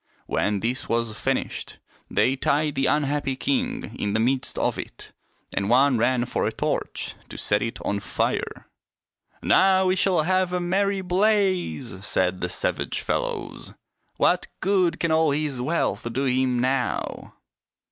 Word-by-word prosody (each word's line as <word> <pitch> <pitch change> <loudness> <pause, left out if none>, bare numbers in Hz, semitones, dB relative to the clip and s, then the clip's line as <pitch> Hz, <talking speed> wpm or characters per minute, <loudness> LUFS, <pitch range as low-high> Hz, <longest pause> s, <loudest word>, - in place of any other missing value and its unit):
When 100 -1 0
this 120 +3 -2
was 115 -2 0
finished 135 +3 -2 0.3
they 130 - +2
tied 145 +2 +1
the 135 - +1
unhappy 145 -2 0
king 255 - -2
in 100 0 -1
the 110 - +2
midst 130 +3 0
of - - 0
it, - - -9 0.4
and 100 +1 -1
one 130 0 +4
ran 120 +1 +2
for - - -1
a - - -1
torch - - -2 0.2
to - - -8
set 105 0 +1
it 115 - -3
on 100 - 0
fire. 100 - -2 0.4
" - - -50
Now 190 0 +4
we 185 0 +3
shall 185 -4 +2
have 185 +1 +1
a 180 - +1
merry 195 +2 0
blaze," 185 - +1
said 90 -2 0
the 90 - -1
savage - - -1
fellows. - - -3 0.2
" - - -49
What - - +2
good 190 -3 +2
can 170 - 0
all 160 0 +4
his 145 -3 -1
wealth 135 -4 -1
do 130 +4 -1
him 130 -1 +1
now 125 -1 -1
135 Hz, 155 wpm, -24 LUFS, 120-185 Hz, 0.4 s, one